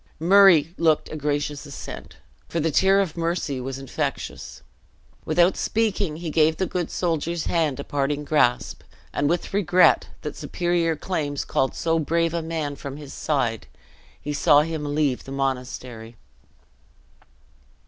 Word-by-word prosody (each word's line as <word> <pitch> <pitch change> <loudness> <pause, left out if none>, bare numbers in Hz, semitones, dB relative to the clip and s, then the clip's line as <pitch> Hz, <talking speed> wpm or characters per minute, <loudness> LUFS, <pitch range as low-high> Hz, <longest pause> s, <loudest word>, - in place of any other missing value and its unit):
Murray 175 -2 +6
looked 160 -2 +2
a - - -5
gracious 145 -1 -2
assent, 140 - -9 0.3
for 170 - -2
the 160 0 0
tear 195 +5 +4
of 180 -5 -3
mercy 165 -5 -2
was 130 +1 -5
infectious. 135 -1 -5 0.6
Without 175 +3 +3
speaking, 210 -7 0
he 165 0 -5
gave 160 +1 +3
the 190 - 0
good 180 -2 -3
soldier's 170 -1 -1
hand 155 -5 0
a - - -3
parting 145 +1 -1
grasp; 140 -5 +1 0.3
and 145 - +1
with 175 +2 -2
regret 185 -2 +4 0.2
that - - -5
superior 175 -2 0
claims 150 -4 -3
called 130 - 0
so 165 0 0
brave 165 +2 0
a 170 - -1
man 160 -3 -3
from 140 0 -7
his 145 -2 -10
side, 125 -7 -1 0.5
he 150 - -4
saw 145 0 +5
him 150 -2 -3
leave 145 -5 0
the 135 - -9
monastery. 125 -4 -4
155 Hz, 145 wpm, -24 LUFS, 145-170 Hz, 0.6 s, Murray